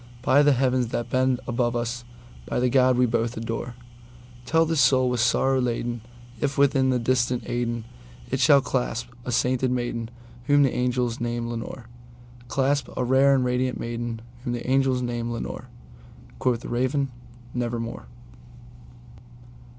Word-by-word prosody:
By 140 Hz, +2 st, +5 dB
that 145 Hz, -1 st, +5 dB
Heaven 130 Hz, -1 st, +1 dB
that 120 Hz, +1 st, -4 dB
bends 130 Hz, -1 st, +2 dB
above 120 Hz, -1 st, 0 dB
us, 120 Hz, +1 st, -2 dB, 0.4 s
by -, -, -1 dB
that 125 Hz, 0 st, +1 dB
God 130 Hz, -1 st, +4 dB
we 125 Hz, -, +4 dB
both 115 Hz, 0 st, -1 dB
adore, 115 Hz, +1 st, -4 dB, 0.7 s
Tell 165 Hz, 0 st, +4 dB
this 160 Hz, -2 st, +1 dB
soul 130 Hz, 0 st, +4 dB
with 125 Hz, -, -1 dB
sorrow 130 Hz, +3 st, +2 dB
laden 120 Hz, -1 st, -2 dB, 0.4 s
if, 140 Hz, +2 st, -1 dB
within 135 Hz, -1 st, +3 dB
the 130 Hz, -, +2 dB
distant 125 Hz, 0 st, +1 dB
Aidenn, 120 Hz, -1 st, -2 dB, 0.5 s
It 130 Hz, -, 0 dB
shall 140 Hz, +2 st, +6 dB
clasp 120 Hz, -3 st, -2 dB, 0.2 s
a 125 Hz, -, -3 dB
sainted 130 Hz, +1 st, +1 dB
maiden 120 Hz, -2 st, -2 dB, 0.4 s
whom 145 Hz, 0 st, +5 dB
the 135 Hz, -, +2 dB
angels 125 Hz, -1 st, 0 dB
name 120 Hz, 0 st, -2 dB
Lenore:Clasp 120 Hz, +3 st, -4 dB
a 130 Hz, -, +1 dB
rare 135 Hz, +2 st, +4 dB
and 130 Hz, -2 st, +1 dB
radiant 125 Hz, 0 st, 0 dB
maiden 115 Hz, -1 st, -4 dB, 0.2 s
whom 120 Hz, -, -2 dB
the 120 Hz, 0 st, -5 dB
angels 130 Hz, -1 st, +2 dB
name 120 Hz, -1 st, -3 dB
Lenore!"Quoth 120 Hz, -, -5 dB
the -, -, -7 dB
Raven, 130 Hz, +3 st, 0 dB, 0.4 s
"Nevermore." 120 Hz, -, -3 dB
125 Hz, 145 wpm, -25 LUFS, 120-130 Hz, 0.7 s, shall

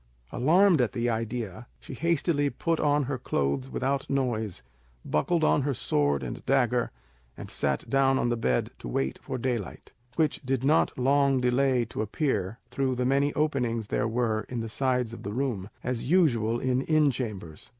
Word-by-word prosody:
Alarmed 170 Hz, +4 st, +4 dB
at 120 Hz, -, 0 dB
the 120 Hz, -1 st, 0 dB
idea, 115 Hz, -1 st, -4 dB
she -, -, -10 dB
hastily 160 Hz, -1 st, +1 dB
put 165 Hz, +5 st, -1 dB
on 145 Hz, -1 st, +2 dB
her 130 Hz, -1 st, -3 dB
clothes 70 Hz, -, -1 dB
without 135 Hz, +1 st, -2 dB
noise, 120 Hz, -7 st, -1 dB, 0.4 s
buckled 160 Hz, -, +1 dB
on 150 Hz, -, +3 dB
her 140 Hz, 0 st, -1 dB
sword 70 Hz, -, 0 dB
and -, -, -6 dB
dagger, -, -, +2 dB, 0.5 s
and -, -, -8 dB
sat 70 Hz, -2 st, -1 dB
down 135 Hz, -1 st, +3 dB
on 120 Hz, -, +1 dB
the 120 Hz, -, +1 dB
bed 65 Hz, -, 0 dB
to -, -, -8 dB
wait 65 Hz, +2 st, -2 dB
for 130 Hz, -, -4 dB
daylight, 120 Hz, -6 st, -4 dB, 0.2 s
which 155 Hz, -3 st, +1 dB
did 130 Hz, -1 st, -1 dB
not 150 Hz, +4 st, +2 dB
long 135 Hz, +1 st, +3 dB
delay 125 Hz, 0 st, +2 dB
to 110 Hz, -, -5 dB
appear 110 Hz, -, -1 dB
through 130 Hz, 0 st, 0 dB
the 125 Hz, 0 st, -1 dB
many 140 Hz, +2 st, +2 dB
openings 125 Hz, -8 st, 0 dB
there -, -, 0 dB
were 115 Hz, -1 st, 0 dB
in 125 Hz, -, -3 dB
the 115 Hz, 0 st, -4 dB
sides 125 Hz, -1 st, 0 dB
of -, -, -8 dB
the 100 Hz, -, -5 dB
room, 115 Hz, -6 st, -2 dB
as 125 Hz, 0 st, -3 dB
usual 120 Hz, -10 st, +3 dB
in 130 Hz, 0 st, +1 dB
inn 155 Hz, -1 st, +3 dB
chambers. 105 Hz, -11 st, -6 dB
125 Hz, 175 wpm, -27 LUFS, 110-140 Hz, 0.5 s, Alarmed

